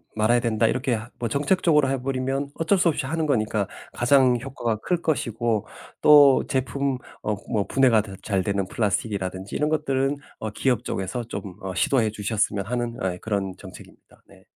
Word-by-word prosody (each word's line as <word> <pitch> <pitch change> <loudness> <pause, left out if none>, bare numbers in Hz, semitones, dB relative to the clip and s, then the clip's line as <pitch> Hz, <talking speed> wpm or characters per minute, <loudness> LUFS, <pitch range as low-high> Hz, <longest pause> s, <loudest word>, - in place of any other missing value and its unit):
말아야 110 +3 +3
된다." 115 -1 +1
이렇게 125 -1 0 0.2
뭐 120 - -1
정책적으로 150 - +2
해 135 -1 -1
버리면 135 +1 -2
어쩔 165 +5 +2
수 175 -1 +3
없이 145 - -2
하는 160 +2 -1
거니까 110 -7 0 0.3
가장 125 0 +4
효과가 120 -3 -3
클 175 -2 0
것이고 115 -8 -1 0.4
또 145 -3 +7
제품 135 0 -1 0.3
어 105 - 0 0.2
뭐 105 -4 +1
분해가 125 -5 +4
다 100 -2 -10
잘되는 100 -1 -1
플라스틱이라든지 100 -2 -2
이런 150 - +1
것들은 140 -2 0 0.2
어 110 - -3
기업 120 +1 0
쪽에서 95 +2 -3
좀 115 - -6 0.2
어 95 -1 -4
시도해 115 +3 +2
주셨으면 105 -1 -1
하는 120 0 -2 0.2
예 90 - -7
그런 100 -3 -2
정책입니다. - - -14
네. - - -19
120 Hz, 360 characters per minute, -24 LUFS, 105-140 Hz, 0.4 s, 또